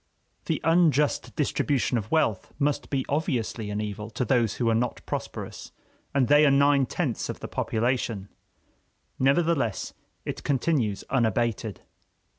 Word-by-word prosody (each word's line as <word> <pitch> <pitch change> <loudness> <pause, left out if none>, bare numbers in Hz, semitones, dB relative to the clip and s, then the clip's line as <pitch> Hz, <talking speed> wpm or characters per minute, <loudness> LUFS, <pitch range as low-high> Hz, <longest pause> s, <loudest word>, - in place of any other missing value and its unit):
The - - 0
unjust 160 -3 +2
distribution 140 -3 0
of 110 -2 -2
wealth 115 -12 +1
must 145 0 0
be 135 -2 -1
obviously 125 - -1
an 105 0 -2
evil 105 0 -4
to 115 +3 -2
those 120 -5 +2
who 120 - -1
are 115 - +4
not 120 +2 -1
prosperous, - - -5 0.4
and 135 -3 +2
they 145 +1 +6
are 150 - +6
nine 140 -1 +4
tenths - - -2
of - - -5
the - - -6
population. 115 -3 -1 0.9
Nevertheless 140 - +1 0.3
it - - -5
continues 130 -7 0
unabated. 115 -3 0
130 Hz, 135 wpm, -26 LUFS, 115-145 Hz, 0.9 s, they